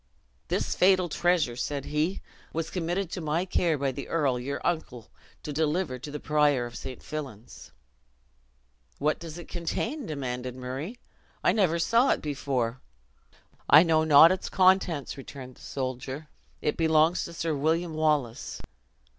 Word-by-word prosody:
"This - - -1
fatal 185 -1 +4
treasure," 170 -6 +1
said 140 +2 -3
he, 155 +5 -1 0.3
"was 165 0 -3
committed 180 +1 -2
to 180 - -4
my 160 +3 0
care 170 -4 +1
by 135 -1 0
the 140 +1 -7
earl, 140 -7 +1
your 140 +3 -4
uncle, 145 -9 -3 0.3
to 150 - -5
deliver 155 -2 0
to 145 - -8
the 150 +1 -5
prior 150 -5 +2
of 120 - -9
St. 130 -2 -7
Fillan's." 135 -8 -8 1.3
"What 150 +2 0
does 165 -1 -8
it 175 - -9
contain?" 225 - -3
demanded 125 -4 -4
Murray; 130 - -5 0.5
"I - - +5
never 180 -6 +2
saw 230 +10 +3
it - - +2
before." 130 -4 -2 0.9
"I 150 +3 +9
know 160 -2 +3
not 160 +2 +8
its 185 - -2
contents," 185 -7 +2
returned 130 -2 -10
the - - -18
soldier; 130 +3 -5 0.3
"it 150 - 0
belongs 160 +1 +3
to - - -8
Sir 165 -1 -2
William 160 +4 0
Wallace." 150 -7 0
155 Hz, 150 wpm, -27 LUFS, 135-170 Hz, 1.3 s, I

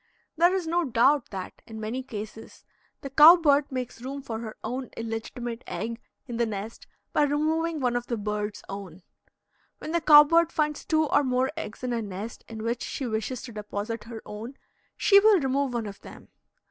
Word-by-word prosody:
There 345 +2 +5
is 370 -3 -1
no 345 +2 +1
doubt 270 +1 +3
that, 190 -2 -7
in 220 -1 -8
many 220 +4 -3
cases, 220 -3 -9 0.4
the 275 - -7
cow 305 +5 +10
bird 290 -4 +2
makes 250 -2 -5
room 275 +2 -6
for 225 -4 -5
her 220 -2 -7
own 255 +1 -4
illegitimate 230 +1 -5
egg 230 +1 -4 0.2
in 240 -3 -5
the 235 -1 +1
nest 210 +1 -6 0.3
by - - +3
removing 310 +3 +1
one 245 -3 0
of 245 0 -2
the 235 - -2
bird's 210 0 -3
own. 195 -3 -8 0.7
When 310 - -7
the 340 0 +1
cow 295 -2 +9
bird 335 +2 +3
finds 300 -1 -1
two 315 -1 +2
or 290 - +3
more 255 0 +1
eggs 220 - -7
in 250 -1 -1
a 230 - -1
nest 205 +2 -7
in 220 -1 -7
which 235 +1 -2
she 270 - -4
wishes 230 +2 -3
to 245 - -8
deposit 210 +1 -5
her 230 -1 -8
own, 225 +6 -8 0.4
she 400 -1 +6
will 415 -2 +5
remove 270 -2 0
one 230 -2 -1
of 200 -1 -8
them. - - -13
245 Hz, 195 wpm, -27 LUFS, 220-295 Hz, 0.7 s, cow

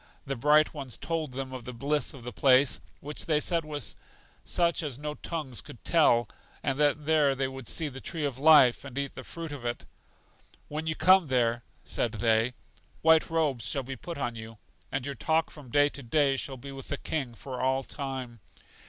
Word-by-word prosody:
The 135 0 -2
Bright 150 +4 +4
Ones 135 -6 -5
told 160 -5 -3
them 130 0 -5
of 130 -2 -6
the 125 - -7
bliss 145 +4 0
of 135 -5 -11
the 120 0 -6
place, 130 +3 +5 0.2
which 150 +2 -5
they 155 -2 +3
said 170 +1 +1
was 150 -1 -4 0.5
such 170 -1 +1
as 145 -6 -4
no 150 +1 -4
tongues 150 -6 -5
could 115 - -13
tell, 120 -9 +4 0.4
and 135 - 0
that 150 0 +2
there 150 -3 +3
they 135 0 0
would 130 -2 -8
see 160 - -1
the 135 -2 -8
Tree 160 -3 -2
of 135 -3 -3
Life, 145 -5 +6
and 135 -2 -9
eat 140 -1 -1
of - - -29
the - - -8
fruit 165 -2 -7
of 145 -4 -7
it. 120 0 -3 0.8
When 155 +2 -4
you 155 - 0
come 185 -1 +5
there, 120 -2 +1 0.2
said 115 - -1
they, 115 +2 +2 0.5
white 160 0 +5
robes 145 -9 0
will 135 - -1
be 135 +1 -6
put 170 +7 -7
on 120 -4 -2
you, 110 0 -9 0.3
and 135 -1 -2
your 140 - -3
talk 160 +3 0
from 145 -5 -12
day 145 +4 +4
to 140 - -8
day 140 +2 +2
shall 135 0 -4
be 140 +3 -9
with 135 -1 -9
the 140 - -2
King 135 -7 -3
for 130 +1 -6
all 130 +1 +1
time. 130 -4 -5
140 Hz, 210 wpm, -29 LUFS, 125-150 Hz, 0.8 s, Life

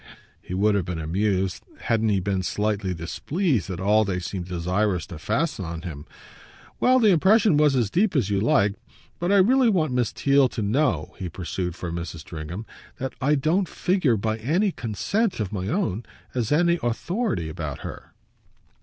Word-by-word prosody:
He 90 - -6
would 105 +2 +3
have 100 -4 0
been 90 -2 -4
amused, 95 +3 -1 0.2
hadn't 110 -1 +1
he 100 -2 +2
been 95 0 -1
slightly 105 0 -1
displeased, 115 - -1
at 90 -2 -4
all 105 +3 +3
they 95 -3 -2
seemed 90 0 -5
desirous 90 +1 0
to 85 -5 -9
fasten 125 - -1
on 85 0 -6
him. 75 -4 -7 0.7
"Well, 255 +1 +5
the 220 -5 +5
impression 195 +3 +4
was 150 -2 +4
as 115 -6 +1
deep 195 0 +2
as 125 -9 +2
you 100 -1 +1
like. 100 -2 +3 0.5
But 175 +3 0
I - - +5
really 240 +6 +5
want 160 -10 +1
Miss 125 -3 +1
Theale 140 -2 +3
to 110 - -2
know," 100 - 0
he 90 - -4
pursued 90 +1 -4
for 90 -1 -5
Mrs. 85 -1 -5
Stringham, 85 +7 -7 0.3
"that 135 0 -4
I 145 +3 +3
don't 160 +6 +1
figure 175 - +1
by 110 +2 -1
any 175 - +1
consent 180 - -1
of 105 -2 -3
my 95 -2 -3
own 155 - -1 0.3
as 120 -2 -1
an 170 +3 +3
authority 170 - -1
about 80 -3 -5
her." - - -9
110 Hz, 180 wpm, -24 LUFS, -, 0.7 s, Well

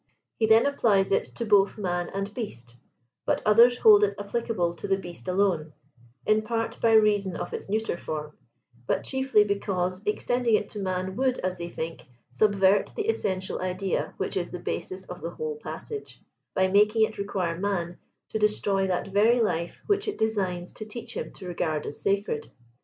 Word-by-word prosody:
He 220 - +3
then 220 +1 +6
applies 215 -9 +2
it.to 235 +4 -1
both 205 -1 +4
man 175 -3 -2
and^ast, 195 - -5 0.5
but - - +1
others 235 +3 +6
hold 210 -3 +7
it 200 -1 +2
applicable 205 -4 -1
to - - -5
the 195 -1 +2
beast 175 -2 -10
alone; 180 -5 +1 0.5
in 215 0 +3
part 230 +1 -3
by 225 -1 +4
reason 205 -4 +4
of - - -5
its - - -6
neuter 215 -3 -1
form, 150 -2 -5 0.5
but - - 0
chiefly 265 -5 +3
because 190 -2 -1
extending 235 +2 +1
it 210 - -1
to 210 - -6
man 185 -1 -2
would, 260 -1 +1
as 185 -1 -2
they 170 0 -4
think, 165 -1 -6
" 120 - -44
subvert 195 +6 +3
the 435 -1 -2
essential 190 - -1
idea 185 +1 -2
which - - -2
is - - -1
the - - -5
basis 375 -1 -4
of - - -9
the - - -3
whole 465 -1 -4
passage," 440 -1 -7 0.4
by 190 0 +3
making 210 +3 +4
it 215 - -1
require 190 -4 -1
man 175 -3 -2 0.3
to 220 - -2
destroy 200 -2 +2
that 185 +1 -1
very 220 +5 +4
life 170 -6 -1
which 410 0 +1
it 420 - -2
designs 190 -5 -1
to - - -7
teach 230 +2 -8
him - - -4
to 185 - -9
regard 160 -3 -2
as - - -7
sacred. 195 -6 -1
200 Hz, 180 wpm, -27 LUFS, 185-220 Hz, 0.5 s, hold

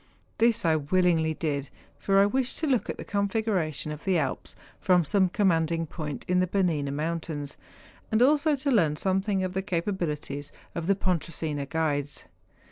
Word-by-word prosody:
This 230 -2 +3
I 160 -1 +4
willingly 160 0 +2
did, 145 -4 -2 0.3
for 195 -1 +2
I 200 - +6
wished 255 +4 0
to 320 - -1
look 260 -6 +1
at - - -3
the - - -7
configuration 200 -7 -1
of 150 0 -7
the 190 -3 +2
Alps 140 -4 -3 0.2
from 180 -3 +3
some 190 +5 +3
com¬ 205 +3 0
manding 165 -2 +2
point 150 -2 -6
in 180 0 +2
the 185 - +2
Bernina 170 -7 0
mountains, 155 -1 -3 0.6
and 220 - +3
also 295 +4 +4
to 280 +1 -1
learn 165 - +3
something 190 +3 0
of 185 -1 -3
the 190 - -1
capabilities 165 -6 -3 0.2
of 170 -1 -4
the 200 - +4
Pon¬ 185 -3 +1
tresina 150 -4 -4
guides. 145 -3 -1
175 Hz, 175 wpm, -27 LUFS, 155-200 Hz, 0.6 s, I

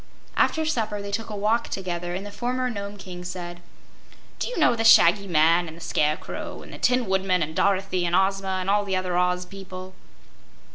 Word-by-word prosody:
After 320 0 +2
supper 220 -9 -1
they 200 0 -6
took 225 +3 -3
a 210 - -5
walk 215 +3 +1
together, 175 -2 -3
and 195 +2 -5
the 205 - -7
former 250 +4 -2
Nome 200 -1 -6
King 180 -2 -8
said: 175 -1 -6 0.8
"Do - - -1
you - - -5
know 305 -7 +4
the 225 - -1
Shaggy 200 -3 +6
Man, 165 +1 +3
and 160 +1 -9
the - - -12
Scarecrow, 155 -1 -2
and - - -12
the - - -9
Tin 250 -1 +2
Woodman, 190 -2 +1
and 155 +1 -5
Dorothy, 195 -2 +1
and 170 - +1
Ozma 190 0 +1
and 185 - -5
all 205 +1 +3
the 195 -2 -2
other 185 -1 -1
Oz 180 0 +1
people?" 185 -1 -9
190 Hz, 200 wpm, -25 LUFS, 180-205 Hz, 0.8 s, Shaggy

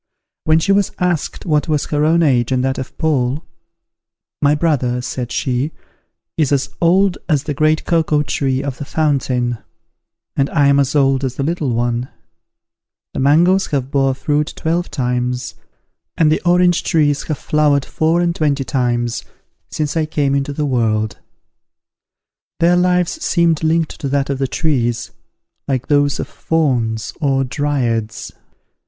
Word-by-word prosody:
When 155 0 +4
she 165 +5 +1
was 200 -1 +2
asked 175 -4 -2
what 150 -3 +1
was 150 -2 0
her 150 0 0
own 165 +2 +3
age 125 -6 +2
and 130 -1 +1
that 135 0 -1
of 130 - -7
Paul, 145 -1 0 1.0
"My 145 +1 +4
brother," 140 -6 0
said 125 0 -4
she, 130 +4 -1 0.6
"is 150 -4 +1
as 140 -1 +1
old 185 +2 +3
as 145 -4 +2
the 150 - -3
great 155 +2 +1
cocoa 155 -3 +2
tree 135 -2 -1
of 135 -2 -5
the - - -4
fountain; 130 -6 0 0.8
and 135 0 +1
I 145 -3 +2
am 140 0 +4
as 140 +1 0
old 135 -1 +3
as 130 -2 -2
the 140 - -2
little 155 -2 -1
one: 120 +1 -1 1.0
the - - -4
mangoes 170 +8 +4
have 135 -2 -2
bore 135 -2 +2
fruit 150 +2 -1
twelve 170 +2 -1
times 125 -2 -2 0.6
and 155 -2 +4
the 155 - +1
orange 175 0 +4
trees 145 -3 +2
have 155 - -2
flowered 145 -2 +1
four 165 +2 +1
and 170 -1 0
twenty 145 -3 0
times, 120 -2 -1 0.5
since 150 0 -3
I 160 -1 0
came 145 -3 0
into 140 +1 0
the 150 +1 -2
world." 110 -5 0 1.4
Their 175 +1 +4
lives 180 - +1
seemed 170 -3 +2
linked 160 0 0
to 140 - -2
that 140 0 0
of 135 - -3
the 135 - 0
trees, 120 -7 -1 0.6
like 130 -2 -2
those 145 -1 +2
of - - -3
Fauns 125 -9 -1
or 135 -2 +2
Dryads. 125 -5 -2
145 Hz, 155 wpm, -18 LUFS, 130-160 Hz, 1.4 s, When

